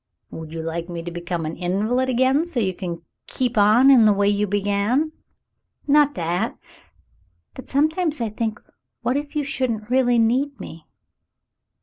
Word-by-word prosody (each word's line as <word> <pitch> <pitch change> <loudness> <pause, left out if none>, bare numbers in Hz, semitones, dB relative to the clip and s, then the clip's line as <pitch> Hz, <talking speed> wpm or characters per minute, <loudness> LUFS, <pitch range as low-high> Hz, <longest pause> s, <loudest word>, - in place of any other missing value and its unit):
"Would 160 -1 -8
you 165 0 -5
like 165 +1 -4
me 170 -1 -5
to 175 - -6
become 170 -1 -4
an 155 - -4
invalid 215 +9 0
again 260 +4 +2
so 345 -8 -3
you 190 -4 0
could 170 -2 -6 0.2
keep 250 -2 -2
on 220 +6 +5
in 240 -5 +6
the 210 - +5
way 200 0 +1
you 205 0 +1
began 205 +9 0 0.4
?" - - -55
"Not 290 0 +4
that 175 0 -2 0.5
— 85 -2 -41
but 260 - -11
sometimes 310 +2 0
I 230 -2 -1
think 220 0 -3 0.4
what 245 +2 0
if 290 +1 -4
you 300 - 0
shouldn't 245 -6 -3
really 250 -2 +3
need 255 +5 +1
me 160 -1 -10
220 Hz, 175 wpm, -22 LUFS, 175-260 Hz, 0.5 s, in